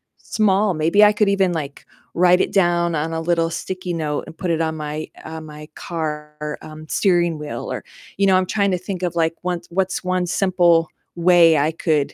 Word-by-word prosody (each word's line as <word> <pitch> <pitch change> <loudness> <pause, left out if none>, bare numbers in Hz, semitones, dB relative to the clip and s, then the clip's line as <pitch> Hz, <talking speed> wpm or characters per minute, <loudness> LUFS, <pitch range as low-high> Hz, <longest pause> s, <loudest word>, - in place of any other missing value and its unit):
small, 205 -1 +1
maybe 165 +6 +3
I 210 - +7
could 210 -1 +1
even, 195 -2 +2
like, 145 -4 -5 0.3
write 180 +1 +4
it - - -1
down 175 -3 +2
on 155 +2 -2
a 165 - -2
little 165 0 +1
sticky 180 +1 -5
note 150 -3 -2
and 160 - -12
put 180 -3 -2
it 165 0 0
on 160 -1 -1
my 150 +1 -5 0.2
uh, 160 0 -7
my 150 -1 -10
car, 150 -2 -5
um, 155 0 -11
steering 175 -3 +1
wheel 145 -6 -6
or - - -4 0.3
you 200 - +2
know, 190 -1 +5
I'm 185 - +1
trying 200 0 0
to 180 - +1
think 185 0 -6
of, 175 -1 -2
like, 165 0 +1
one 180 -1 -2
what's 185 +1 -1
1 185 0 0
simple 175 -2 +2 0.3
way 170 -2 +5
I 150 +3 +2
could 155 -3 0
170 Hz, 205 wpm, -20 LUFS, 155-185 Hz, 0.3 s, I